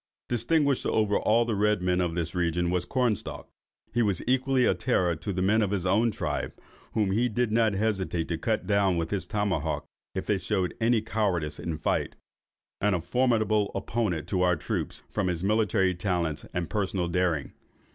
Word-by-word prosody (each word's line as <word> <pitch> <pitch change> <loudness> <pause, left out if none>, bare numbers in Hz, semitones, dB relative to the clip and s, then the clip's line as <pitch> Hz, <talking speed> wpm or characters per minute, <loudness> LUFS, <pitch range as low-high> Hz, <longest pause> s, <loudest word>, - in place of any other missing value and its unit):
Distinguished 140 +4 +1
over 105 -2 +2
all 115 +2 +3
the 115 - -1
other 100 - -2
red 105 -3 +2
men 90 0 +2
of 85 -2 -1
this 85 -1 -2
region, 85 -1 0
was 90 -1 0
Cornstalk. 125 -6 -1 0.5
He 120 - +2
was 100 -6 0
equally 130 0 +2
a - - +4
terror 90 -9 +1
to 100 - -4
the 95 0 -1
men 110 +4 +3
of 105 - +1
his 95 -2 -1
own 105 +5 +3
tribe, 105 - -3 0.4
(whom 105 -3 +1
he 120 +5 +2
did 120 0 0
not 110 -1 +3
hesitate 95 -5 -1
to 85 -2 -2
hew 110 -1 +2
down 100 -2 +2
with 80 -1 -2
his 95 -4 -2
tomahawk 95 -7 -1 0.3
if 95 - -2
they 105 -2 +1
showed 95 0 -1
any 115 0 +3
cowardice 100 -9 -1
in 80 -2 -3
fight,) 80 - -1 0.7
and 105 -1 +3
a - - 0
formidable 110 +1 +1
opponent 95 -5 -1
to 95 - 0
our 90 -1 +4
troops, - - -4
from 100 -3 -1
his 90 -1 -2
military 100 -2 +2
talents 85 -4 -2
and 90 -2 -3
personal 95 -4 -1
daring. 85 -4 0
100 Hz, 185 wpm, -27 LUFS, 90-110 Hz, 0.7 s, a